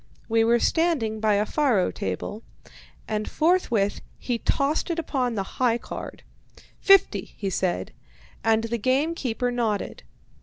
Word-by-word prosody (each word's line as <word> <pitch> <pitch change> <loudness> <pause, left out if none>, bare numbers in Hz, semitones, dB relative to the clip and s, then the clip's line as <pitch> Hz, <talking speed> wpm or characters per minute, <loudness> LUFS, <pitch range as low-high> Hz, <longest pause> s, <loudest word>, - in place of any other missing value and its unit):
We 225 0 +3
were 235 +1 +4
standing 255 -7 +1
by 215 -1 +2
a 205 +1 +2
faro 250 -9 +1
table, 95 - -4 0.7
and 215 -1 -2
forthwith 305 - +1 0.2
he 240 -2 -2
tossed 285 +8 0
it 340 - -1
upon 260 -7 -1
the 195 - -1 0.2
"high 240 -2 +3
card." - - -8 0.6
"Fifty," 370 - +4
he 195 -2 -3
said, 185 -1 -1 0.5
and 225 0 +3
the 230 +1 -2
game 270 +8 +1
keeper 245 -5 -2
nodded. 225 -4 -2
230 Hz, 140 wpm, -25 LUFS, 215-275 Hz, 0.7 s, were